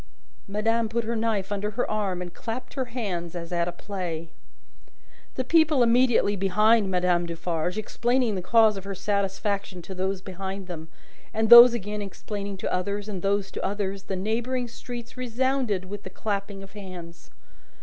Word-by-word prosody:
Madame 225 +3 0
put 235 +1 -1
her 230 +1 -2
knife 220 -4 -1
under 205 +1 -1
her 225 +4 -1
arm, 195 -4 -1
and 175 -1 -9
clapped 240 +2 -6
her 260 -2 -2
hands 195 -9 -4
as 170 0 -6
at 170 -1 +1
a - - -1
play. 175 -3 -5 1.1
The 260 - -1
people 310 -2 +4
immediately 235 -3 +4
behind 210 +2 +3
Madame 180 -1 +2
Defarge, 170 +2 -2
explaining 240 +2 +1
the 190 - -2
cause 220 +2 +4
of 195 - -6
her 195 0 -5
satisfaction 200 -1 -1
to 190 - -7
those 190 +1 -1
behind 190 +1 -5
them, 165 -3 -7 0.5
and 220 +1 +1
those 235 0 +12
again 210 -1 -4
explaining 200 0 -5
to - - -3
others, 200 +3 -2
and 195 -4 -5
those 195 0 0
to - - -5
others, 195 -1 -2
the 190 - -3
neighbouring 235 +6 -1
streets 240 +1 -8
resounded 250 -5 0
with 205 +2 -7
the 190 - -8
clapping 200 0 -4
of 195 - -12
hands. 180 -4 -10
200 Hz, 170 wpm, -26 LUFS, 185-230 Hz, 1.1 s, those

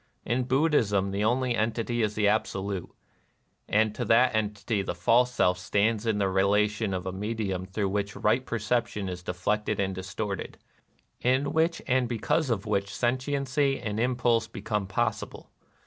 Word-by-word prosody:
In 120 +3 0
Bud 135 +6 +2
dhism 100 -8 +2
the 100 +1 -1
only 125 +2 +1
entity 115 +2 -1
is 105 -1 0
the 105 -1 +2
Absolute; 100 -3 -1 0.8
and 110 +1 +3
to - - -3
that 125 +2 +4
entity 105 0 -1
the 95 - -4
false 125 +2 +3
self 90 -6 +2
stands 105 +4 +1
in 110 -2 +2
the 100 - +1
rela 100 +2 +3
tion 105 -1 -3
of 90 -1 -4
a 95 - -2
medium 95 -2 -3
through 100 +1 -1
which 100 +1 -2
right 120 +5 +2
percep 120 0 0
tion 105 -4 -5
is 90 -1 -5
deflected 105 +4 -1
and 95 -1 0
distorted, 95 +1 -5 0.4
— - - -40 0.2
in 130 +3 +1
which 165 +1 +1
and 130 -2 +1
because 130 +6 0
of 110 -5 -1
which 100 0 0
sentiency 135 +5 0
and 105 0 -3
impulse 120 -1 +1
be - - -9
come 105 -2 -1
possible. 95 - -3
110 Hz, 175 wpm, -27 LUFS, 100-120 Hz, 0.8 s, that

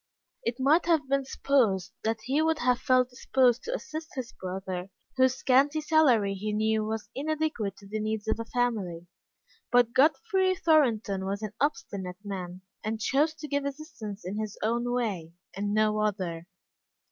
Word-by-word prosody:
It 235 +2 -2
might 305 +6 +4
have 320 -5 +3
been 275 0 +1
supposed 230 - +1
that 225 0 -1
he 275 +4 +1
would 320 0 +2
have 250 -3 +2
felt 255 -1 +3
disposed 250 -1 +2
to - - -2
assist 315 -7 -7
his 255 -3 -5
brother, 185 0 -5 0.3
whose 260 -1 +4
scanty 275 +4 +3
salary 275 -11 +3
he 210 +2 -3
knew 220 0 +1
was 220 0 -4
inadequate 295 -8 -2
to 200 - -14
the 215 +2 -3
needs 215 0 -2
of 220 - 0
a 230 - -3
family. 215 -9 -1 0.7
But 245 -1 +4
Godfrey 375 - +3
Thornton 240 - +2
was 200 +2 -3
an 215 -1 -4
obstinate 195 -11 -2
man, 185 -3 -6 0.2
and 220 +1 -2
chose 295 +7 +2
to 310 -1 -7
give 285 -1 -1
assistance 270 - -7
in 195 +4 -3
his 215 -2 -4
own 235 +2 0
way, 200 -10 -2 0.2
and 205 +1 -2
no 215 0 +2
other. 185 -5 -2
230 Hz, 165 wpm, -28 LUFS, 205-280 Hz, 0.7 s, might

